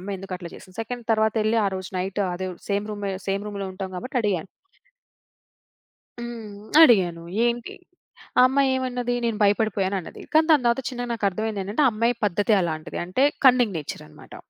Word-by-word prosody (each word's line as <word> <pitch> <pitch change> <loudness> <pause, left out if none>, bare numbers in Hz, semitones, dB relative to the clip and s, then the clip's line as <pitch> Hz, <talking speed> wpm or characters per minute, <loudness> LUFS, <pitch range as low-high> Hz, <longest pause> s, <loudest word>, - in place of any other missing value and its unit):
ఆమ్మాయి 195 +1 -5
ఎందుకు 195 -1 -6
అట్లా 175 -2 -8
చేసింది. 185 -1 -14
సెకండ్ 240 +1 -6
తరువాత 220 0 +2
ఎళ్ళి 225 +1 +2
ఆ - - +3
రోజు 185 0 -6
నైట్ 190 +2 -2
అదే 185 +1 -4 0.2
సేమ్ 200 +1 0
రూమ్ 205 -1 -5 0.2
సేమ్ 200 +1 -1
రూమ్‌లో 200 -2 -4
ఉంటాం 190 0 -6
కాబట్టి 255 +7 -5
అడిగా. 195 -7 0 1.8
హ్మ్. 225 -4 -7 0.2
అడిగాను 180 - +5 0.2
ఏంటి 240 0 -2 0.6
ఆ - - +9
అమ్మాయి 275 0 +2
ఏమన్నది 250 -1 -2
నేను 230 -2 -1
భయపడిపోయాను 200 -2 +2
అన్నది. 170 - -11
కానీ 315 +1 +5
దాని 300 -5 +6
తర్వాత 235 +3 +2
చిన్నగా 245 -2 -5
నాకు 225 -3 -3
అర్థమైంది 215 +1 -3
ఏంటంటే, 205 +10 -1
ఆ - - +6
అమ్మాయి 230 +3 +1
పద్ధతే 205 +3 +2
అలాంటిది 155 -1 -4
అంటే 185 +9 0 0.2
కన్నింగ్ 245 -6 +5
నేచరనమాట. 150 - -9
210 Hz, 170 wpm, -24 LUFS, 190-240 Hz, 1.8 s, ఆ